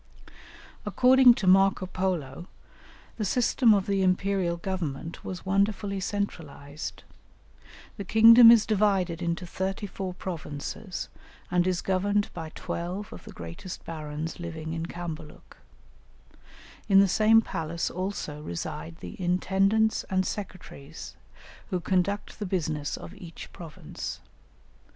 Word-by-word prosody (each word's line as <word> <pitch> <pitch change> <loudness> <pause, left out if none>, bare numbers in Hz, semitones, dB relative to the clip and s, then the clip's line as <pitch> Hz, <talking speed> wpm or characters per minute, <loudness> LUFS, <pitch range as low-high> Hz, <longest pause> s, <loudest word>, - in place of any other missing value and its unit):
According 255 -1 +6
to 205 - -3
Marco 195 0 +4
Polo 175 -5 -3 0.7
the 220 - -2
system 235 +3 +3
of 200 -3 +3
the 200 -1 0
Imperial 185 -1 +1
Government 170 -4 -4
was 185 0 -6
wonderfully 200 +1 0
centralized. 160 -7 -5 0.9
"The 200 - -4
kingdom 230 +4 +9
is 230 -2 +7
divided 195 -5 +1
into 170 +1 -2
thirty 190 +4 -3
four 190 -2 -5
provinces, 175 +2 -5 0.4
and 180 0 +2
is 180 -1 0
governed 200 +2 +1
by 160 -1 -6
twelve 180 +5 -5
of - - -11
the - - -9
greatest 85 - -8
barons 155 0 -5
living 160 -2 -5
in 165 0 -3
Cambaluc; 165 -3 -8 1.3
in 195 -1 +7
the 200 - +6
same 215 +4 +5
palace 165 -2 -3
also 185 -5 -4
reside 85 - -5
the 90 - -7
intendants 195 +4 +2
and 190 -1 0
secretaries, 180 -7 -7 0.5
who 185 -3 -1
conduct 190 +4 -1
the 205 - -3
business 155 -5 -2
of - - -10
each 170 -2 -11
province. 165 -3 -7
185 Hz, 120 wpm, -27 LUFS, 165-200 Hz, 1.3 s, kingdom